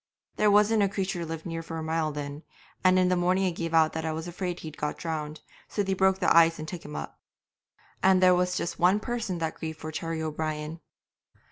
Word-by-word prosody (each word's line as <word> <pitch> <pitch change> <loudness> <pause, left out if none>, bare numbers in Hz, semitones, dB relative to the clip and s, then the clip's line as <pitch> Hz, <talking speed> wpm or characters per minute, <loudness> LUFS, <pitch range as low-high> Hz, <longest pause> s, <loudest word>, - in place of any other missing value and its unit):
'There 210 - +4
wasn't 210 +1 +4
a 200 - +3
creature 190 -2 -2
lived 165 -1 -6
near 165 -1 -4
for 165 0 -6
a 160 - -4
mile 160 -1 0
then, 145 0 -6 0.4
and 185 0 +5
in 185 0 +4
the 180 - +3
morning 180 +2 +2
I 185 - +1
gave 165 -1 -4
out 160 -1 +4
that 160 - -3
I 160 - -1
was 160 +2 -4
afraid 180 0 -4
he'd 155 -1 -8
got 150 - -3
drowned, 155 -2 -4 0.3
so 205 - -1
they 195 0 0
broke 190 0 +3
the 185 - +2
ice 165 0 +6
and 155 - -6
took 175 0 -6
him 75 - -8
up. 75 -2 -6 0.8
And 190 -1 +5
there 185 0 +6
was 180 0 +1
just 170 - -3
one 185 +4 +4
person 230 -5 -3
that 160 -1 -2
grieved 160 -1 -6
for 155 - -6
Terry 165 +1 -3
O'Brien. 155 0 -3
165 Hz, 230 wpm, -27 LUFS, 160-185 Hz, 0.8 s, ice